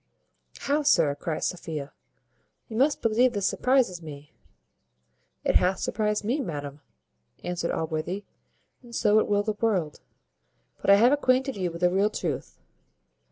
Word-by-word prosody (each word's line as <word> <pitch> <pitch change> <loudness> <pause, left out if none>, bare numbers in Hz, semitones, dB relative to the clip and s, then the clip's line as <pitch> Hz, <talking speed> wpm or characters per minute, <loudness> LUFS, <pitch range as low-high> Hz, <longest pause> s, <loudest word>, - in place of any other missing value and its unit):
"How, 290 +2 +1
sir!" 165 - +3
cries 155 +2 -3
Sophia 155 -5 -4 0.8
"you 220 - -7
must 280 +5 +2
believe 235 +2 +3
this 200 -2 -1
surprizes 250 -9 +1
me." 150 -2 -11 1.1
"It - - +4
hath 185 +1 +1
surprized 210 0 -1
me, 250 +8 0
madam," 145 - -6 0.6
answered 175 -1 -2
Allworthy, 160 +5 -3 0.6
"and 240 -2 -11
so 210 +1 +4
it - - 0
will 205 0 +2
the 215 0 -1
world. 185 -10 0 0.8
But - - -1
I 200 - +9
have 235 +5 +5
acquainted 265 -1 +2
you 185 -3 -1
with 170 +1 -9
the 180 0 +4
real 195 +3 +2
truth." - - -4
200 Hz, 145 wpm, -26 LUFS, 165-235 Hz, 1.1 s, I